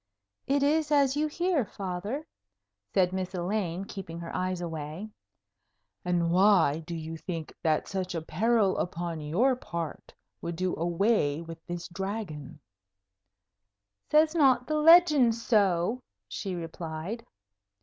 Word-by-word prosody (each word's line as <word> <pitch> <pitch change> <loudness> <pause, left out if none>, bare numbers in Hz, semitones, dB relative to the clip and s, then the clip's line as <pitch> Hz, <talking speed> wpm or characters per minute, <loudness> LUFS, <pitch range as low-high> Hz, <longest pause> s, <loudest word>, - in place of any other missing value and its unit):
"It 280 +1 +2
is 305 +1 +2
as 280 -2 +4
you 305 +1 +1
hear, 340 -2 0
Father," 200 - -5 0.7
said 185 -2 +2
Miss 190 0 -3
Elaine, 180 0 -2
keeping 185 -5 -7
her 170 -1 -7
eyes 185 0 -1
away. 165 +4 -5 0.9
"And 175 -1 +1
why 180 -5 +4
do 170 - -4
you 160 0 -6
think 165 -1 -6
that 155 -2 +1
such 185 -2 -3
a 165 - -2
peril 205 +4 +2
upon 170 -2 -3
your 210 - +2
part 170 - -6 0.3
would 170 0 -4
do 185 +2 -1
away 170 -2 +1
with 165 0 -10
this 175 -1 -5
Dragon?" 180 -7 -5 1.5
"Says 310 +1 +4
not 270 -6 +4
the 305 +2 -1
legend 300 -7 +6
so?" 210 -1 +1 0.3
she 195 -4 -4
replied. 165 +5 -5
185 Hz, 130 wpm, -28 LUFS, 170-235 Hz, 1.5 s, legend